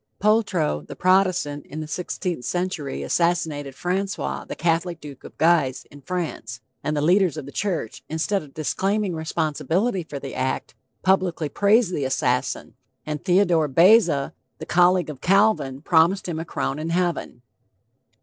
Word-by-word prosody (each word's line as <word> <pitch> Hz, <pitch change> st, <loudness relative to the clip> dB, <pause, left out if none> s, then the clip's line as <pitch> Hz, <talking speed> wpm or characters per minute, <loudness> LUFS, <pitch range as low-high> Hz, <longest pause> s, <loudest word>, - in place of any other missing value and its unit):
POLTROT, 205 Hz, -, +1 dB
the -, -, -8 dB
Protestant, 185 Hz, -6 st, +2 dB
in 155 Hz, -, -7 dB
the 155 Hz, -, -4 dB
16th 175 Hz, -2 st, -4 dB
century 175 Hz, -3 st, -3 dB
assassinated 160 Hz, -5 st, 0 dB
Francois, 190 Hz, +4 st, -2 dB
the -, -, -6 dB
Catholic 170 Hz, +1 st, 0 dB
duke 145 Hz, -4 st, -11 dB
of -, -, -12 dB
Guise, 160 Hz, -6 st, +2 dB
in 145 Hz, -, -13 dB
France, 155 Hz, -9 st, -4 dB, 0.2 s
and 150 Hz, 0 st, -1 dB
the 145 Hz, -, 0 dB
leaders 180 Hz, -1 st, +3 dB
of 150 Hz, -, -5 dB
the 140 Hz, -, -9 dB
church, 175 Hz, -, -3 dB
instead 170 Hz, +6 st, 0 dB
of 145 Hz, -3 st, -15 dB
disclaiming 195 Hz, +5 st, -1 dB
responsibility 165 Hz, +6 st, -1 dB
for 155 Hz, -3 st, -7 dB
the 135 Hz, -1 st, -7 dB
act, 130 Hz, 0 st, -2 dB, 0.3 s
publicly 185 Hz, -5 st, +1 dB
praised 205 Hz, -, +3 dB
the 145 Hz, -, -1 dB
assassin, 130 Hz, 0 st, -1 dB, 0.3 s
and 150 Hz, -1 st, -4 dB
Theodore 175 Hz, -4 st, +3 dB
Beza, 165 Hz, -, +4 dB, 0.2 s
the -, -, -7 dB
colleague 180 Hz, -2 st, +3 dB
of 140 Hz, -, -12 dB
Calvin, 195 Hz, -9 st, +2 dB
promised 175 Hz, +4 st, +3 dB
him 165 Hz, -2 st, -3 dB
a 165 Hz, -, -4 dB
crown 145 Hz, -3 st, -3 dB
in 160 Hz, +2 st, -3 dB
heaven. 170 Hz, -8 st, -2 dB
165 Hz, 150 wpm, -23 LUFS, 145-185 Hz, 0.3 s, Beza